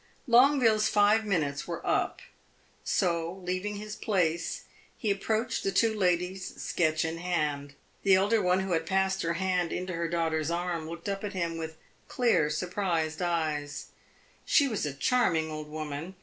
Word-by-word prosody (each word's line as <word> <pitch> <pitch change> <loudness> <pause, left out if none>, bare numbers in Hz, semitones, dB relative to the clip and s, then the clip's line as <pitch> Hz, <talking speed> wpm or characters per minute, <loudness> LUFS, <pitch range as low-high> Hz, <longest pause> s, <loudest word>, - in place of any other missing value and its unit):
Longueville's 240 -4 +5
five 210 +1 +4
minutes 150 -8 -1
were 170 -1 -5
up; - - 0 0.6
so, 170 -1 0
leaving 185 +3 -2
his 210 +1 -6
place, 170 -5 -1 0.3
he 215 - 0
approached 220 +4 -1
the 195 - 0
two 220 +3 +3
ladies, 185 -1 -1
sketch 160 -1 0
in 165 +1 -3
hand. 150 -5 -2 0.3
The 195 -1 +5
elder 205 +4 +3
one, 180 +1 +2
who 190 -1 -3
had 165 -1 0
passed 190 0 +1
her 165 0 0
hand 180 -1 0
into 180 0 -3
her 170 0 -1
daughter's 160 -2 0
arm, 170 -2 -2
looked 170 +3 -7
up 195 0 -3
at 205 0 -4
him 170 -3 -2
with 160 -1 -6 0.3
clear, 230 -12 +2
surprised 170 -1 -1
eyes; 155 -4 -2 0.5
she 285 - +4
was 215 - -2
a 145 - -4
charming 160 - +1
old 155 -1 -6
woman. 155 +3 -5
180 Hz, 160 wpm, -29 LUFS, 160-200 Hz, 0.6 s, Longueville's